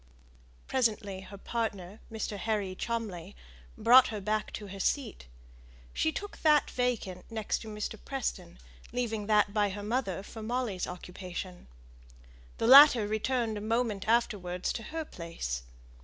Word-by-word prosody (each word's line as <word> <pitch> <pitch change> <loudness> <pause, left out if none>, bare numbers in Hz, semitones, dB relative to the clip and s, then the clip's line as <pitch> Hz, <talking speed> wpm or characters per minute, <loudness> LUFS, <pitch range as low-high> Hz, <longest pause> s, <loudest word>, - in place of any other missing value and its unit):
Presently 215 -6 0
her 190 +1 -10
partner, 205 -3 -4
Mr. 220 -2 -3
Harry 205 -2 -1
Cholmley, 205 -5 -4 0.4
brought 240 +3 +7
her 215 - -4
back 215 +2 -1
to 210 - -6
her 195 +1 -8
seat. 225 - -1 0.7
She 315 - +1
took 410 +5 -6
that 300 -2 +4
vacant 230 -8 -1
next 220 -2 -2
to 225 - -10
Mr. 210 -1 -5
Preston, - - -4 0.3
leaving 225 -4 -2
the 215 - +2
one 210 - +6
by 210 -1 +2
her 205 +1 -6
mother 210 -4 -1
for 220 +2 -9
Molly's 225 -4 -2
occupation. 180 0 -7 0.9
The - - -1
latter 255 -3 +9
returned 220 0 -1
a - - -8
moment 220 -2 -1
afterwards 200 -6 0
to 230 - -5
her 320 0 -4
place. 165 - -5
215 Hz, 140 wpm, -30 LUFS, 190-235 Hz, 0.9 s, latter